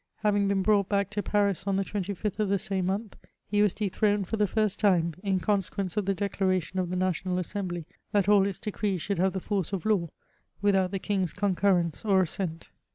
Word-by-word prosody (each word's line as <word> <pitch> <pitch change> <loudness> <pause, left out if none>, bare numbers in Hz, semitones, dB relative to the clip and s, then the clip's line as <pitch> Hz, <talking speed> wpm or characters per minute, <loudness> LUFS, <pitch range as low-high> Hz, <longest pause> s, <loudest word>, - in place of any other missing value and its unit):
Having 205 -1 +3
been 195 -1 +1
bnmght 200 -1 +3
badk 200 -1 +1
to 210 -1 -1
Paris 200 -2 0
on 195 - +2
the 195 0 0
25th 200 +1 -3
of 210 -2 +1
the 200 - +3
same 195 -2 -1
mcmth, 205 +3 -2 0.3
he 205 0 +1
was 210 -2 +4
dethroned 205 0 +1
fi>r 225 - -1
the 210 - +3
first 215 0 0
time, 175 -5 +3
in 195 -2 0
consequence 195 -1 -1
of 210 -3 -1
the 195 - +2
declaration 190 -2 -1
of 180 -2 -1
the 185 - -2
Nadonal 185 0 0
Assembly, 180 -2 -3 0.3
that 200 -3 +2
all 200 -1 +5
its 195 - -3
decrees 205 -3 -2
should 200 -4 -2
have 190 +1 +2
the 190 - -2
force 195 -2 -2
of 190 -1 -3
law, 195 -6 +2 0.5
without 195 -2 +2
tiie 195 -1 -4
king's 190 -5 0
concurrence 185 -4 +1
or 195 -3 +4
assent. 165 -1 -5
195 Hz, 210 wpm, -28 LUFS, 185-205 Hz, 0.5 s, all